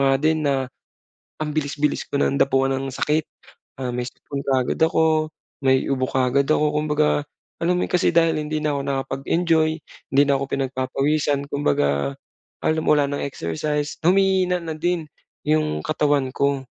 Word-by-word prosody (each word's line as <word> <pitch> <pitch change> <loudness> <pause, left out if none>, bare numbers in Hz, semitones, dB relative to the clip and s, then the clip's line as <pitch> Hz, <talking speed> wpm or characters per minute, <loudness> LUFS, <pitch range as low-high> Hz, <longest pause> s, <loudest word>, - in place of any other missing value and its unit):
nga 135 0 +4
din 155 +2 +1
na, 135 -2 0 0.7
ang 150 - -3
bilis-bilis 145 -1 -1
ko - - -5
ng 140 - +1
dapuan 135 0 +2
ng 135 0 -2
sakit, 150 +4 0 0.6
ah, 130 -1 -2
may 125 0 -2
sipon 140 -1 -7
kaagad 130 +1 0
ako, 160 -1 +2 0.3
may 130 0 +3
ubo 130 -2 0
kaagad 130 +2 +1
ako, 150 -1 +2
kumbaga 150 -1 +1 0.4
alam 175 +2 +2
mo 180 - +1
kasi 180 - +3
dahil 165 -2 +3
hindi 150 +1 -3
na 150 -1 0
ako - - -2
nakapag-enjoy, 155 +4 +1 0.4
hindi 140 +1 +6
na 140 -1 +2
ako - - -1
pinagpapawisan, 140 +2 0
kumbaga 70 - 0 0.5
alam 160 0 +2
mo - - +4
wala 145 - +3
ng 145 0 -3
exercise, 145 - -3
humihina 185 0 +3
na 160 - -3
din 175 +1 -1 0.4
'yung 75 0 +1
katawan 145 -4 +1
ko. 140 -1 0
145 Hz, 155 wpm, -22 LUFS, 135-155 Hz, 0.7 s, hindi